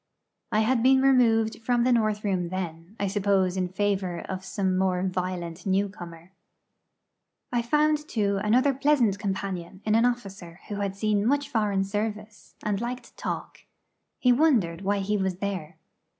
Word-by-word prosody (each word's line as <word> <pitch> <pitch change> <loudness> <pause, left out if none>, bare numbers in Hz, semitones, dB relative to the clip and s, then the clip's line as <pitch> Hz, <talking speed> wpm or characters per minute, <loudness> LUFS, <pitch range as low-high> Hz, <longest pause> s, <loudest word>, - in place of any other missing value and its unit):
I 215 - +3
had 230 +2 +2
been 265 +2 +5
removed 230 -5 +3
from 240 0 +2
the 255 - +3
north 215 -3 +1
room 185 -4 -1
then; 175 0 -5
I 200 - 0
suppose 195 -2 +1
in 185 -1 0
favour 190 -2 -1
of 190 0 -6
some 190 -1 -1
more 185 -1 +1
violent 180 -2 -3
newcomer. 190 -3 -3 1.2
I 240 - +2
found, 300 +4 +1
too, 200 -3 0
another 255 +6 +3
pleasant 260 -7 +2
companion 190 -3 -4
in 215 - +2
an 230 +2 +4
officer 195 -8 -3
who 205 - -3
had 200 -1 -2
seen 210 0 +1
much 285 +2 +1
foreign 205 -4 +1
service, 210 +1 -5
and 205 -1 -1
liked 245 0 -5
talk. - - -5 0.6
He 250 - +3
wondered 235 - +2
why 200 0 0
he 210 +2 0
was 190 -2 -1
there. 185 -4 -4
200 Hz, 155 wpm, -26 LUFS, 185-230 Hz, 1.2 s, been